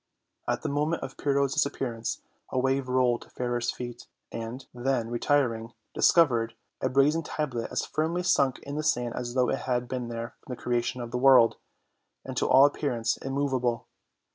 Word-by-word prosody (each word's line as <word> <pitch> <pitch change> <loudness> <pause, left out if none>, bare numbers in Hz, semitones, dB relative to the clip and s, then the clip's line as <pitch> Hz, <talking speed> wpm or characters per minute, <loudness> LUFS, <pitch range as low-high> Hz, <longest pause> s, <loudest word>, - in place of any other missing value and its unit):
At - - -1
the - - -1
moment 150 +4 0
of 135 - -6
Pyrrho's 140 -1 +1
disappearance 135 -6 -2 0.3
a - - -3
wave 130 +1 +1
rolled 125 -2 +2
to - - -14
Fairer's 120 -1 -2
feet 120 -1 -6 0.2
and, 115 +3 -6
then 125 -2 -1
retiring, 120 -2 +1 0.2
discovered 120 -9 +4 0.3
a 130 - +1
brazen 140 +5 +3
tablet 135 -7 -3
as - - -1
firmly 165 +3 -1
sunk 140 -7 +3
in 140 0 -6
the - - 0
sand 120 -5 +1
as 125 0 -4
though 125 -1 +3
it - - 0
had 125 -1 0
been 125 -1 -3
there 115 0 -5
from 125 - -7
the - - -20
creation 120 +1 -1
of 120 -1 -6
the 125 - -1
world, 130 -3 +6 0.7
and 130 - -6
to - - +1
all 135 +2 +8
ap 145 - +2
pearance 115 -6 0
immovable. 135 -3 -1
125 Hz, 180 wpm, -28 LUFS, 120-140 Hz, 0.7 s, all